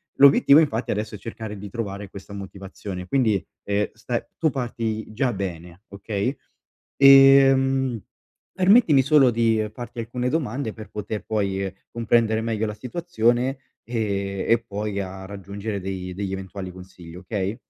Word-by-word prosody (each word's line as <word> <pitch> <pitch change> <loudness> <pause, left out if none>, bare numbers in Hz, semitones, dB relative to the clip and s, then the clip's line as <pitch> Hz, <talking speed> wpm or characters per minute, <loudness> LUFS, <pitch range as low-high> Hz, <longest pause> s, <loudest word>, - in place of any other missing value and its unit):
L'obiettivo 140 +1 +7
infatti 125 -7 0
adesso 105 +1 -3
è - - -5
cercare 110 0 -7
di 100 - -8
trovare 100 -2 -5
questa 100 +1 -11
motivazione. 95 -1 -8
Quindi, 110 -6 +1 0.2
ehm, 100 +1 0
stai 115 +1 -3 0.2
tu 160 - +3
parti 115 -5 -3
già 125 +3 +1
bene, 90 -2 -6
okay, 100 +5 -3 0.6
ehm, 135 -2 +6 0.5
permettimi 185 - +5
solo 140 -1 +5
di, 115 -2 +1
farti 120 +1 -9
alcune 125 +2 -3
domande 135 -5 -2
per 110 0 -10
poter 105 0 -5
poi, 100 -3 -1 0.2
comprendere 115 -1 +2
meglio 110 -1 -1
la 105 - -4
situazione 125 -1 0 0.3
e 100 -4 -2
e 115 0 +3
poi 105 -1 -4
a 95 0 -6
raggiungere 100 +1 -6
dei 95 -1 -5
degli 95 +1 -4
eventuali 95 0 -6
consigli, 90 -2 -12
okay? 95 +3 -3
110 Hz, 140 wpm, -23 LUFS, 100-125 Hz, 0.6 s, L'obiettivo